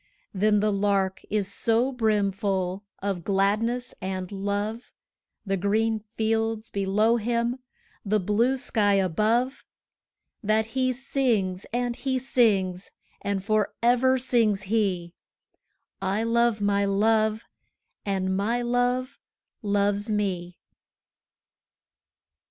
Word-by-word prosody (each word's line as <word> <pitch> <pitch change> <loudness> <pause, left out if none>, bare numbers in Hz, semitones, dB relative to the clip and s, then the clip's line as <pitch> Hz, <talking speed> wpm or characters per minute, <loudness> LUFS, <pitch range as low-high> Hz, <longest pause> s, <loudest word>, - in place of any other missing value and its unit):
But 210 +1 +2
the 210 0 +2
Lark 195 -1 0
is 205 -2 0
so 235 +3 +1
brimful 200 -4 0 0.2
of 195 -4 -2
gladness 210 +6 0
and 185 0 -4
love, 205 +3 -3 0.5
The 195 -1 0
green 215 +3 +1 0.2
fields 225 0 -1
below 205 +4 +2
him, 235 +2 -1 0.4
the 215 +1 +1
blue 220 +7 +1
sky 215 -5 +1
above, 215 - +1 0.8
That 215 +1 +2
he 260 -1 +1
sings, 240 -8 -1
and 245 0 -1
he 265 -1 -1
sings; 200 -8 +1 0.3
and 200 -1 -2
for 215 0 0
ever 250 +2 +4
sings 230 -6 +1
he 185 -6 0 0.9
'I 195 +3 0
love 230 -1 +2
my 200 0 +2
Love, 215 +2 +2 0.6
and 190 -2 -1
my 230 +5 0
Love 245 +2 0 0.4
loves 205 0 0
me!' 180 -4 -2
215 Hz, 105 wpm, -26 LUFS, 195-235 Hz, 0.9 s, ever